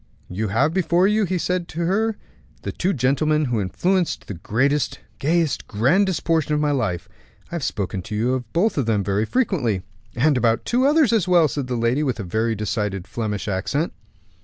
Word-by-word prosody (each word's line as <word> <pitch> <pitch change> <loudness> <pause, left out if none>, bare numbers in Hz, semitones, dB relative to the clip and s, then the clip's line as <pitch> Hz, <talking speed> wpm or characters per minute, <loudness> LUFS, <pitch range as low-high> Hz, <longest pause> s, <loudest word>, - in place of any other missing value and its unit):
"You 105 +4 -2
have 135 +10 +1
before 180 0 +3
you," 210 0 +2
he 185 0 -1
said 180 0 -1
to 170 - -5
her, 210 +5 +1 0.5
"the - - -3
two 185 - 0
gentlemen 150 +2 +1
who 120 -5 0
influenced 175 - 0
the - - -6
greatest, 130 - 0 0.2
gayest, 160 -1 0
grandest 155 - +2
portion 160 -2 +1
of - - +1
my 150 -1 +1
life. 90 - -1 0.4
I - - -9
have 170 -4 -3
spoken 95 -5 -2
to 105 +4 -6
you 120 +4 +1
about 170 - 0
them 115 -7 0
both - - -11
very 100 +2 +1
frequently." 130 - 0 0.3
"And 140 +3 +3
about 115 -2 +1
two 255 +3 +2
others 295 -5 +4
as 205 -6 +2
well," 175 -3 +5
said 140 -2 -3
the 125 - -2
lady, 120 +4 +1
with 130 -6 -1
a - - -3
very 110 +5 0
decided 105 -3 -2
Flemish 105 -3 -3
accent. 105 - -1
140 Hz, 190 wpm, -22 LUFS, 110-175 Hz, 0.5 s, well